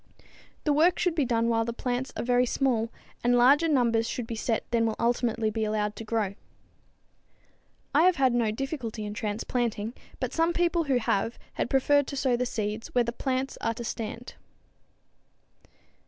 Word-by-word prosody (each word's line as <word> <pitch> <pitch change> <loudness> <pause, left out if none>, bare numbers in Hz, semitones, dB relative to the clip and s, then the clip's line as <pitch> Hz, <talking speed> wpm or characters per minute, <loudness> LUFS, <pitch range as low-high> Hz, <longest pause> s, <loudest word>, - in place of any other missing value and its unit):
The 300 - +2
work 330 +5 +4
should 360 - +1
be 305 -4 +1
done 230 -1 +1
while 225 -1 +2
the 235 +1 -3
plants 250 +2 -2
are - - -2
very 245 +1 +3
small, 235 -4 0 0.3
and 245 0 +4
larger 280 +7 +5
numbers 235 -6 +2
should 245 - -3
be 230 - -5
set 225 0 -1
than 230 -1 +2
will 220 - -1
ultimately 230 -2 +1
be 220 0 -2
allowed 210 -1 -1
to - - -6
grow. 215 -3 -1 1.6
I 295 - +5
have 370 - +4
had 260 -5 +3
no 235 -2 +2
difficulty 235 -2 -4
in 205 - -5
transplanting, 220 +1 -2 0.3
but - - -3
some 330 +1 +2
people 340 -1 +1
who 270 -3 +2
have 225 -1 0 0.2
had - - -2
prefer 285 +2 +4
to 280 0 -6
sow 260 -2 +2
the 250 +1 -1
seed 215 0 -3
where 245 - +4
the 235 - -2
plants 260 +2 -2
are 230 - 0
to 235 - -6
stand. 230 +1 -5
240 Hz, 180 wpm, -27 LUFS, 225-265 Hz, 1.6 s, larger